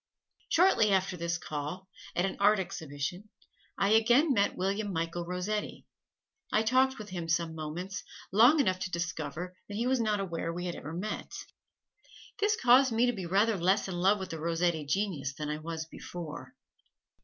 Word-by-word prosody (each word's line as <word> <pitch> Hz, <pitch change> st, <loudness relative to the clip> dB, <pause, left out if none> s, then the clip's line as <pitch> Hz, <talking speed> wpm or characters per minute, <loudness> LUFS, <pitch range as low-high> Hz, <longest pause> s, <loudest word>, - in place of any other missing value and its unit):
Shortly 330 Hz, -, +4 dB
after 190 Hz, -1 st, +1 dB
this 170 Hz, 0 st, -2 dB
call, 155 Hz, +3 st, -5 dB, 0.3 s
at 175 Hz, -, +2 dB
an 195 Hz, -, -2 dB
Art 205 Hz, +2 st, +5 dB
Exhibition, 180 Hz, 0 st, -5 dB, 0.5 s
I 195 Hz, -, +2 dB
again 240 Hz, +7 st, +5 dB
met 200 Hz, -3 st, +1 dB
William 200 Hz, +2 st, -1 dB
Michael 170 Hz, 0 st, -3 dB
Rossetti. 180 Hz, +4 st, -3 dB, 0.7 s
I 215 Hz, -, +3 dB
talked 260 Hz, +3 st, +3 dB
with 215 Hz, -1 st, -8 dB
him 175 Hz, -3 st, -5 dB
some 170 Hz, -1 st, +1 dB
moments 165 Hz, +5 st, -5 dB, 0.3 s
long 240 Hz, -, +6 dB
enough 185 Hz, -9 st, +2 dB
to 185 Hz, -, -3 dB
discover 170 Hz, 0 st, -4 dB
that 205 Hz, -, -7 dB
he 235 Hz, -, 0 dB
was 260 Hz, 0 st, +2 dB
not 215 Hz, -2 st, +1 dB
aware 170 Hz, -3 st, -3 dB
we 175 Hz, +1 st, -4 dB
had 175 Hz, -, -2 dB
ever 155 Hz, -, -7 dB
met. 200 Hz, +5 st, -4 dB, 1.1 s
This 420 Hz, +1 st, +2 dB
caused 255 Hz, +1 st, +6 dB
me 230 Hz, +2 st, +3 dB
to 245 Hz, -, +1 dB
be 190 Hz, -6 st, -5 dB
rather 200 Hz, +4 st, +3 dB
less 190 Hz, +4 st, +2 dB
in 190 Hz, -, -4 dB
love 190 Hz, +4 st, +3 dB
with 190 Hz, -2 st, -6 dB
the 160 Hz, -, -5 dB
Rossetti 165 Hz, -1 st, 0 dB
genius 175 Hz, -6 st, -1 dB
than 150 Hz, 0 st, -4 dB
I 150 Hz, -, -2 dB
was 160 Hz, 0 st, -5 dB
before. 160 Hz, -1 st, -8 dB
185 Hz, 175 wpm, -30 LUFS, 170-215 Hz, 1.1 s, long